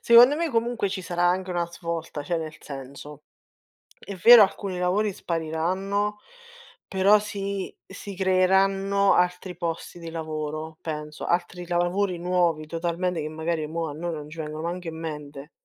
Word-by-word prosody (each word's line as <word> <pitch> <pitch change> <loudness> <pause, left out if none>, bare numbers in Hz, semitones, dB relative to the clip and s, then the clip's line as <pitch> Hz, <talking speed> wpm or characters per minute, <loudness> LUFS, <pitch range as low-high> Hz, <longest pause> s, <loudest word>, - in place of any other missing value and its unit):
secondo 240 +5 +7
me 335 +1 0
comunque 235 -4 0
ci 190 -1 -4
sarà 175 0 -1
anche 185 +1 +1
una 175 -1 0
svolta, 170 -3 -5
cioè 170 +4 -1
nel 160 -1 -5
senso, 140 +2 -9 0.7
è 200 - -8
vero 230 +4 +9
alcuni 195 -2 -1
lavori 195 +3 +1
spariranno, 185 +6 -1 0.7
però 195 +2 +5
si 200 -2 -4
si 200 0 -9
creeranno 195 +1 +3
altri 180 0 0
posti 170 0 -4
di 165 -1 -7
lavoro, 155 -1 -5
penso, 150 -1 -5
altri 175 +1 -1
lavori 175 +2 0
nuovi 170 -3 +1
totalmente, 170 +1 -1
che 150 - -3
magari 160 0 -2
mo' 165 +1 -3
a - - -5
noi 170 +3 -3
non 150 -1 -7
ci 165 - -11
vengono 155 0 -5
manc' 175 +2 -4
in 165 -1 -5
mente. 150 -2 -7
175 Hz, 155 wpm, -25 LUFS, 160-195 Hz, 0.7 s, vero